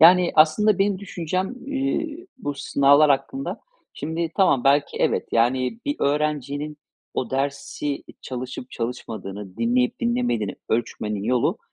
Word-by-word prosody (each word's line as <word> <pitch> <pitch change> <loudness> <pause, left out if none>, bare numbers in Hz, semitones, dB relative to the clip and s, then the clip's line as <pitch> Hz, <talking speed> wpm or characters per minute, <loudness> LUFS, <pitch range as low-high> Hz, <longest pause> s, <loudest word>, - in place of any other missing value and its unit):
Yani, 175 +2 +7
aslında 175 +7 +5
benim 195 -1 +2
düşüncem, 185 +2 -3
eee, 295 +5 -2
bu 145 - -3
sınavlar 140 +2 +4
hakkında 140 - -1 0.3
Şimdi 160 +2 -2
tamam, 145 -10 +4
belki 140 +1 +3
evet, - - +1
yani, 130 - +2
bir 290 0 -1
öğrencinin 150 0 -1 0.4
o 125 - -2
dersi 140 +1 -2 0.2
çalışıp 130 0 -6
çalışmadığını, 105 -5 -5
dinleyip 245 +1 +1
dinlemediğini 235 - 0
ölçmenin 105 -3 -1
yolu, 120 +2 +1
150 Hz, 120 wpm, -24 LUFS, 130-200 Hz, 0.4 s, Yani